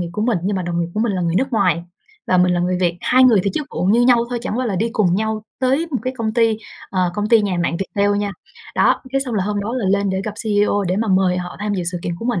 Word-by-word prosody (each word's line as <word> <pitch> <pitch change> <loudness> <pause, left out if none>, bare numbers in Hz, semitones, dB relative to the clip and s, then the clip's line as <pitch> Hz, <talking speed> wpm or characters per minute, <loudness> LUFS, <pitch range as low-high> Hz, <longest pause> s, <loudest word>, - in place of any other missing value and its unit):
nghiệp 175 - -3
của 210 - -2
mình, 225 -4 +1
nhưng 195 +1 -1
mà 185 - -2
đồng 170 0 -2
nghiệp 170 - -1
của 215 - -1
mình 225 -2 +1
là 185 - -2
người 170 -1 0
nước 260 +7 0
ngoài 180 -7 +2 0.4
và 185 - +3
mình 180 0 +4
là 175 - 0
người 180 +1 0
Việt, 175 -1 +1
2 255 +1 +4
người 230 -6 +5
thì 200 - 0
chức 300 - -2
vụ - - -3
như 210 +6 +4
nhau 245 -1 +5
thôi, 245 -1 -2
chẳng 235 -1 -3
qua 255 - 0
là 200 -4 -1
đi 225 +5 0
cùng 190 -7 +2
nhau 220 +1 -1 0.2
tới 270 +6 +1
một 265 - -1
cái 255 0 -2
công 220 -2 -2
ty, 225 -2 +2 0.3
ờ, 185 -2 +1
công 210 +2 -1
ty 230 -1 +6
nhà 195 -3 -1
mạng 170 - -1
Viettel 200 +2 0
nha. 205 -1 -2 0.4
Đó, - - +3
cái 270 - +1
xong 255 -4 -3
là 195 -3 0
hôm 205 0 -1
đó 225 +5 -3
là 250 - -2
lên 200 0 +1
để 190 0 -1
gặp 215 - -3
CEO 205 -2 +1
để 180 +1 -1
mà 220 +1 -1
mời 185 -1 +3
họ 180 0 -6
tham 210 0 -1
dự 185 - -2
sự 175 - -3
kiện 170 - -3
của 225 - -8
mình. 235 -7 0
205 Hz, 315 wpm, -19 LUFS, 185-230 Hz, 0.4 s, ty